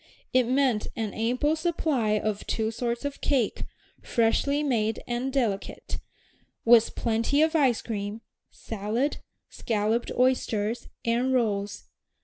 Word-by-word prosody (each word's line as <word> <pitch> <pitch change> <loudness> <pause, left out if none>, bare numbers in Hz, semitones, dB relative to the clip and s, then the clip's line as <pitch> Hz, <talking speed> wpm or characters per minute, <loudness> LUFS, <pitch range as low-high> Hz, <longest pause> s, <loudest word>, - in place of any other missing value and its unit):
It 255 -2 +4
meant 255 -4 +2
an 220 -3 -3
ample 250 +7 +1
supply 310 -10 +1
of 210 -1 -2
two 220 0 0
sorts 235 +3 -3
of 285 -1 -4
cake, 260 -7 0 0.4
freshly 280 +6 +1
made 225 -6 0
and 245 +2 -2
delicate, 230 -8 -2 0.7
with 230 -1 +6
plenty 230 +6 +2
of 320 +1 +1
ice 265 -7 +3
cream, 210 0 -4 0.3
salad, 225 +6 -2 0.3
scalloped 220 +1 -1
oysters, 235 -3 +1 0.2
and 240 +3 +1
rolls. 205 -4 -1
235 Hz, 120 wpm, -27 LUFS, 220-265 Hz, 0.7 s, with